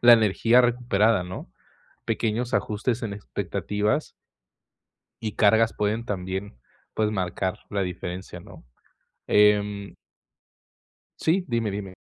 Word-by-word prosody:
la 120 0 +8
energía 115 +2 +5
recuperada, 115 -5 +2
¿no?, 90 -8 -8 0.5
pequeños 120 +3 -1
ajustes 110 +3 -1
en 110 -3 -3
expectativas 105 +5 -2 1.1
y 110 -2 -3
cargas 110 +2 +4
pueden 105 +3 -1
también, 95 - -4 0.4
pues, 110 -1 +1
marcar 95 -1 -2
la 100 -2 0
diferencia, 90 0 -5
¿no?, - - -14 0.6
em 105 -1 +3 1.2
Sí, 180 +3 +2
dime, 115 -3 0
dime. 100 -2 -6
105 Hz, 105 wpm, -25 LUFS, 100-115 Hz, 1.2 s, la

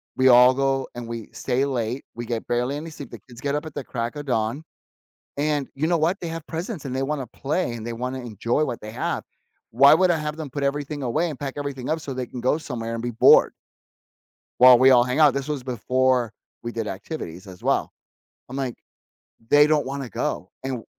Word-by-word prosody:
we 130 0 +4
all 125 +1 +8
go 135 0 0
and 120 -1 -6
we 115 -2 -6
stay 130 +1 0
late, 125 -1 -2
we 120 +1 -5
get 115 -1 -4
barely 125 +4 0
any 160 +3 -6
sleep, 145 -4 -10
the - - -9
kids 120 -1 -13
get 140 0 -1
up 150 +2 -2
at 155 - -8
the 145 - -5
crack 120 +1 -4
of 145 0 -6
dawn, 115 +4 -1 0.7
and 145 -1 0
you 155 +4 -1
know 170 -1 +2
what, 165 +5 +1
they 170 - -4
have 165 -2 -6
presents, 170 +2 -5
and 130 -2 -4
they 130 - -1
wanna 140 -1 -2
play, 140 +4 -2
and 115 -2 -6
they 120 - -4
wanna 125 +3 -4
enjoy 120 +4 -1
what 125 -5 -4
they 105 0 -8
have. - - -2 0.5
Why 135 +5 +7
would 180 +3 +5
I - - +1
have 150 0 -4
them 155 -3 -6
put 140 +2 -4
everything 145 +1 -2
away 150 +8 0
and 145 - -7
pack 140 -2 -4
everything 140 -3 -4
up 160 - +1
so 145 -3 -6
they 125 -1 -3
can 125 - -7
go 130 +5 +1
somewhere 115 -7 -5
and 115 - -4
be 120 - -2
bored?" 115 - +6 1.1
while 125 0 +10
we 130 +2 +6
all 120 -1 +6
hang 125 +4 -1
out, 150 -3 +6
this 140 0 -3
was 145 -4 -3
before 125 -1 +1 0.3
we 120 - -4
did 115 -1 -3
activities 95 - -6
as 90 -1 -12
well. - - 0 0.6
I'm, 130 - -7
like, 130 -3 -2 0.8
"They 145 0 +7
don't 150 -1 +2
wanna 135 -1 -5
go, - - -3
and 135 0 -2
w 115 -4 -6
130 Hz, 230 wpm, -24 LUFS, 120-145 Hz, 1.1 s, while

